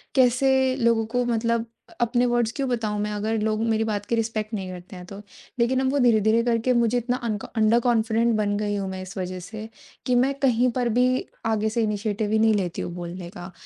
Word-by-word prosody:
कैसे 260 Hz, 0 st, +3 dB
लोगों 230 Hz, -3 st, +2 dB
को 245 Hz, 0 st, +2 dB
मतलब 230 Hz, -1 st, 0 dB, 0.2 s
अ, -, -, -16 dB
अपने 240 Hz, +1 st, +2 dB
वर्ड्स 240 Hz, -2 st, +1 dB
क्यों 275 Hz, -1 st, -1 dB
बताऊँ 220 Hz, -4 st, -1 dB
मैं, 210 Hz, 0 st, -2 dB
अगर 215 Hz, +2 st, -1 dB
लोग 215 Hz, 0 st, 0 dB
मेरी 225 Hz, -1 st, +1 dB
बात 210 Hz, -2 st, -2 dB
की 235 Hz, -, 0 dB
रिस्पेक्ट 225 Hz, -1 st, -2 dB
नहीं 190 Hz, -3 st, -3 dB
करते 180 Hz, +1 st, -10 dB
हैं 180 Hz, 0 st, -9 dB
तो?" 195 Hz, +2 st, -9 dB, 0.4 s
लेकिन 245 Hz, +2 st, +2 dB
अब 260 Hz, 0 st, +1 dB
वो 285 Hz, -, +1 dB
धीरे-धीरे 225 Hz, -2 st, +4 dB
करके 235 Hz, +1 st, +1 dB
मुझे 235 Hz, 0 st, +2 dB
इतना 245 Hz, +1 st, -1 dB
अन्क 215 Hz, -3 st, -2 dB
अंडर 220 Hz, +1 st, +4 dB
कॉन्फिडेंट 230 Hz, -1 st, +2 dB
बन 205 Hz, -1 st, 0 dB
गई 205 Hz, 0 st, -1 dB
हूँ 195 Hz, -1 st, -3 dB
मैं 190 Hz, 0 st, -5 dB
इस 185 Hz, +2 st, -9 dB
वजह 185 Hz, 0 st, -4 dB
से, 215 Hz, +4 st, -8 dB, 0.4 s
कि 250 Hz, -, +2 dB
मैं 260 Hz, +3 st, +3 dB
कहीं 250 Hz, -2 st, +3 dB
पर 245 Hz, -1 st, +1 dB
भी 250 Hz, -, +5 dB, 0.4 s
आगे 220 Hz, -1 st, +1 dB
से 230 Hz, +2 st, -1 dB
इनिशिएटिव 210 Hz, 0 st, -1 dB
ही 220 Hz, -, +3 dB
नहीं 220 Hz, 0 st, +4 dB
लेती 180 Hz, -4 st, -2 dB
हूँ -, -, -4 dB
बोलने 175 Hz, 0 st, -7 dB
का। 175 Hz, -1 st, -9 dB
225 Hz, 225 wpm, -24 LUFS, 205-240 Hz, 0.4 s, भी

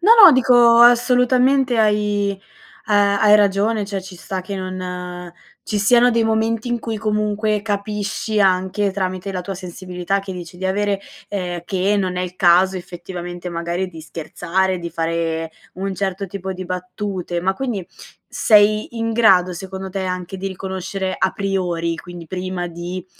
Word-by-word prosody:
No, 415 Hz, +6 st, +6 dB
no, 350 Hz, -, +11 dB
dico, 245 Hz, -2 st, +5 dB
assolutamente 250 Hz, +1 st, +4 dB
hai, 210 Hz, -1 st, +2 dB
ehm, 195 Hz, -, -10 dB, 0.8 s
hai 210 Hz, -1 st, +6 dB
ragione 205 Hz, +1 st, +2 dB
cioè 195 Hz, -1 st, -3 dB
ci 185 Hz, 0 st, -11 dB
sta 190 Hz, +1 st, -5 dB
che 195 Hz, +2 st, -6 dB
non 180 Hz, -2 st, -6 dB, 0.3 s
ci 210 Hz, -, -2 dB
siano 245 Hz, +4 st, +5 dB
dei 230 Hz, -, +2 dB
momenti 225 Hz, +1 st, 0 dB
in 240 Hz, 0 st, 0 dB
cui, 225 Hz, -1 st, -4 dB
comunque, 210 Hz, 0 st, 0 dB
capisci 210 Hz, +1 st, -2 dB
anche 190 Hz, +1 st, +2 dB
tramite 185 Hz, 0 st, -3 dB
la 185 Hz, -, -3 dB
tua 195 Hz, +2 st, -5 dB
sensibilità, 180 Hz, +1 st, -3 dB
che 195 Hz, -1 st, -7 dB
dici 175 Hz, -1 st, -9 dB
di 190 Hz, -, -7 dB
avere, 200 Hz, +1 st, 0 dB, 0.3 s
ehm, 180 Hz, -4 st, -4 dB
che 195 Hz, +1 st, 0 dB
non 185 Hz, -2 st, -1 dB
è -, -, -1 dB
il 180 Hz, 0 st, -5 dB
caso, 185 Hz, +2 st, +4 dB
effettivamente, 175 Hz, 0 st, -7 dB
magari, 170 Hz, +2 st, -3 dB
di 165 Hz, -2 st, -11 dB
scherzare, 175 Hz, +4 st, -2 dB
di 170 Hz, -1 st, -6 dB
fare 165 Hz, 0 st, -2 dB, 0.2 s
un 195 Hz, +1 st, -3 dB
certo 195 Hz, 0 st, -3 dB
tipo 190 Hz, 0 st, -5 dB
di 185 Hz, 0 st, -7 dB
battute. 180 Hz, -1 st, -4 dB
Ma, 190 Hz, +2 st, +1 dB
quindi, 230 Hz, -8 st, -3 dB, 0.4 s
sei 215 Hz, +1 st, +3 dB
in 225 Hz, 0 st, -1 dB
grado, 190 Hz, -6 st, +4 dB
secondo 190 Hz, +1 st, -7 dB
te, 195 Hz, 0 st, -3 dB
anche 185 Hz, 0 st, -4 dB
di 195 Hz, +1 st, -5 dB
riconoscere 190 Hz, 0 st, -4 dB
a 190 Hz, -, +1 dB
priori, 175 Hz, -4 st, -1 dB
quindi 175 Hz, -2 st, -10 dB
prima 185 Hz, -1 st, -4 dB
di, 175 Hz, +2 st, -6 dB
190 Hz, 160 wpm, -20 LUFS, 180-210 Hz, 0.8 s, no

